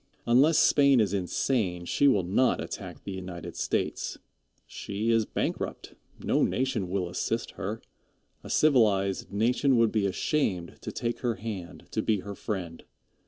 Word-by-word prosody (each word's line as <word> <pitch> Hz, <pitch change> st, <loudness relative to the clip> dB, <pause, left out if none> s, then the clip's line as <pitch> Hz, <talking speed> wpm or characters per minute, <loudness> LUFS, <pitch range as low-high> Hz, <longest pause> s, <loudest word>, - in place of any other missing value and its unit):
Unless 135 Hz, +7 st, +5 dB
Spain 140 Hz, -3 st, +5 dB
is 105 Hz, -3 st, +2 dB
insane, 95 Hz, -1 st, -1 dB
she 145 Hz, -, +2 dB
will 105 Hz, -9 st, +4 dB
not 100 Hz, +9 st, +2 dB
attack -, -, -7 dB
the 100 Hz, -, -6 dB
United 90 Hz, -2 st, -7 dB
States. -, -, -2 dB, 0.5 s
She 105 Hz, +3 st, -3 dB
is 115 Hz, -2 st, +2 dB
bankrupt. -, -, -3 dB, 0.3 s
No -, -, +2 dB
nation 125 Hz, -8 st, 0 dB
will 95 Hz, -1 st, -1 dB
assist 115 Hz, +6 st, -2 dB
her. 100 Hz, +3 st, -5 dB, 0.6 s
A -, -, -9 dB
civilized 105 Hz, -12 st, +2 dB
nation 125 Hz, +5 st, +2 dB
would 115 Hz, -1 st, +4 dB
be 105 Hz, -3 st, +1 dB
ashamed 95 Hz, -, -1 dB
to -, -, -5 dB
take 120 Hz, 0 st, -3 dB
her 120 Hz, -3 st, -1 dB
hand, 95 Hz, -4 st, -7 dB
to -, -, 0 dB
be 105 Hz, -3 st, +1 dB
her 100 Hz, +1 st, -7 dB
friend. 95 Hz, -6 st, -5 dB
105 Hz, 150 wpm, -28 LUFS, 95-120 Hz, 0.6 s, Unless